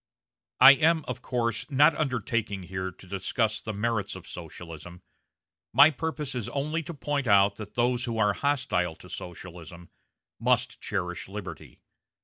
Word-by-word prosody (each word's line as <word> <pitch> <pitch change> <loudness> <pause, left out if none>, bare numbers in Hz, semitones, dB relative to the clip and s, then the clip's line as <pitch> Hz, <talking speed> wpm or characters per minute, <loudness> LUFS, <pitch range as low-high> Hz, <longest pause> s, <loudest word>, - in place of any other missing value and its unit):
I 135 - +11
am, 160 +3 +3
of 125 0 -5
course, 115 -2 -2
not 145 +3 +5
undertaking 115 -8 -2
here 95 +1 -4
to 90 - -16
discuss 100 +4 -1
the 110 - -4
merits 105 -1 -1
of 95 -2 -10
Socialism; 85 0 -9 0.7
my 150 - +8
purpose 150 -1 -4
is 120 -5 -3
only 150 +4 -2
to 170 +2 -7
point 145 -2 -2
out 100 -1 +4
that 105 -2 -9
those 120 0 +1
who 115 -1 -3
are 105 -2 +3
hostile 95 - 0
to - - -15
Socialism 85 -1 -9 0.5
must - - +1
cherish 90 -1 -3
liberty. 100 -1 -8
110 Hz, 145 wpm, -27 LUFS, 95-135 Hz, 0.7 s, I